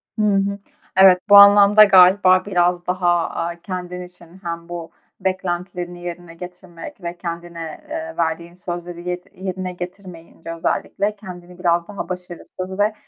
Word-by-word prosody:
Hı 215 - -2
hı. 200 0 +1 0.4
Evet, 190 -1 +7
bu 205 - +8
anlamda 200 +1 +8
galiba 185 -1 +6
biraz 175 -2 +1
daha, 175 -2 +1
aaa, 170 0 -4
kendin 180 -1 -6
için 180 0 -14
hem 170 0 -6
bu 170 -2 -7 0.3
beklentilerini 180 -1 -4
yerine 175 -1 -7
getirmek 180 - -11
ve 170 0 -5
kendine, 170 -2 -7
eee, 320 +1 -6
verdiğin 170 +1 -2
sözleri 175 0 -7
yed 180 0 -4
yerine 185 0 -5
getirmeyince 175 -2 -9
özellikle 200 +5 -2
kendini 180 -3 -12
biraz 170 -1 +1
daha 205 -1 -7
başarısız 185 +1 -7
ve 210 +1 +2
180 Hz, 140 wpm, -20 LUFS, 175-190 Hz, 0.4 s, bu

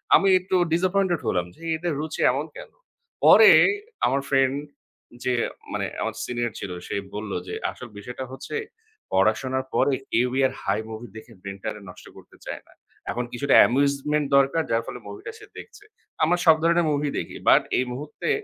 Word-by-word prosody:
আমি 195 - +4
একটু 185 +1 -2 0.2
disappointed 185 0 +1
হলাম 90 -1 +1
যে, - - -21
"এদের 170 +1 -2
রুচি 155 +1 -4
এমন 140 +4 -2
কেন?" - - -10 0.5
পরে 445 - +9 0.5
আমার 140 - +1
ফ্রেন্ড 135 -1 +3 0.7
যে 125 0 +1 0.4
মানে - - -1 0.2
আমার - - -2
সিনিয়র 120 -1 -2
ছিল। 95 - -5 0.2
সে - - -4 0.2
বলল 105 -1 -5 0.2
যে - - -5 0.2
আসল 125 - -10
বিষয়টা 125 +5 -7
হচ্ছে, 135 - -7 0.6
"পড়াশোনার 130 +7 +1
পরে 135 +1 +2 0.2
কেউই 125 +2 +1
আর 130 - -8
হাই 100 +2 0
মুভি 110 +2 -7
দেখে 110 - -12
ব্রেইনটারে 100 +2 -6
নষ্ট 90 - -13
করতে - - -17
চায় - - -6
না। - - -21 0.4
এখন 120 - -2
কিছুটা 140 +3 +2
amusement 140 +3 +1
দরকার, 140 +4 +3
যার 115 0 +2
ফলে - - -7
মুভিটা 100 0 -8
সে 425 - -13
দেখছে। 425 -3 -12 0.4
আমরা 170 +3 +3
সব 160 -2 +8
ধরনের 170 0 +3
মুভি 145 0 0
দেখি। - - -7
বাট - - +7 0.2
এই 130 - +1
মুহূর্তে 145 +4 -5
135 Hz, 170 wpm, -24 LUFS, 120-155 Hz, 0.7 s, পরে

